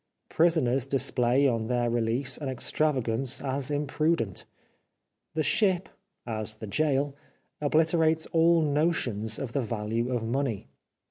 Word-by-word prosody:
Prisoners 140 -6 +2
display 135 0 +2
on 115 -3 0
their 120 -1 +1
release 120 +2 0
an 145 -3 -4
extravagance 130 -2 0
as 135 0 -3
imprudent. 145 - -1 0.9
The 155 - +1
ship, 185 +4 +1 0.4
as 110 -2 -3
the 110 - -8
gaol, 140 +4 0 0.5
obliterates 160 +1 +2
all 165 0 +4
notions 140 -8 0
of 135 -4 -5
the 140 - +1
value 115 +1 -2
of 115 -3 -1
money. 120 -4 -2
135 Hz, 120 wpm, -28 LUFS, 115-155 Hz, 0.9 s, all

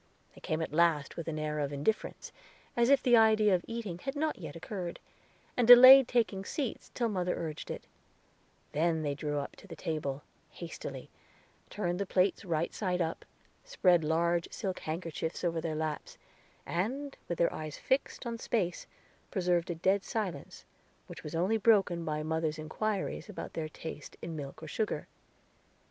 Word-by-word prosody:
They - - -16
came 155 +1 -1
at 155 - -6
last 160 -3 +2
with 170 - -6
an 160 -1 -2
air 150 0 -2
of 145 -1 -1
indifference, 145 +10 -2 0.4
as 235 +1 +3
if 280 -1 +5
the 245 -1 +6
idea 215 -2 +5
of 175 -1 +1
eating 220 -7 -5
had 270 +8 -4
not 305 -3 -1
yet 155 -5 -7
occurred, 175 +1 -5 0.6
and 245 -2 +2
delayed 255 +2 +11
taking 220 -6 +1
seats 265 +2 -4
till 240 - +1
mother 180 -4 -1
urged 155 -2 -5
it; - - -5 0.9
then 160 +1 +1
they 145 -1 0
drew 145 +1 -3
up 140 - -4
to - - -14
the 165 - -8
table, 150 -3 -3 0.3
hastily, - - -8 0.6
turned 180 -3 -2
the 200 - -2
plates 185 0 +2
right 170 -3 -1
side 180 -3 -1
up, 165 -1 -2 0.4
spread 180 - +3
large 170 +2 +1
silk 190 -4 -3
handkerchiefs 160 +1 -4
over 165 -2 0
their 160 -1 -2
laps, 155 -1 -4 0.5
and, 265 +11 -2
with 175 - -3
their 170 - +2
eyes 155 -1 -6
fixed 265 0 -1
on 230 -1 -4
space, 190 -8 -1 0.4
preserved 180 -3 +1
a 175 - -1
dead 190 +4 +2
silence, 185 -10 -4 0.4
which - - -10
was 150 +1 -6
only 185 +7 +2
broken 195 -6 +3
by 155 -1 -2
mother's 160 0 -1
inquiries 205 +7 -3
about 210 - -7
their 155 -1 -3
taste 155 -1 -8
in 165 -1 -4
milk 140 +1 -7
or - - -6
sugar. 215 +8 -2
175 Hz, 170 wpm, -31 LUFS, 155-215 Hz, 0.9 s, delayed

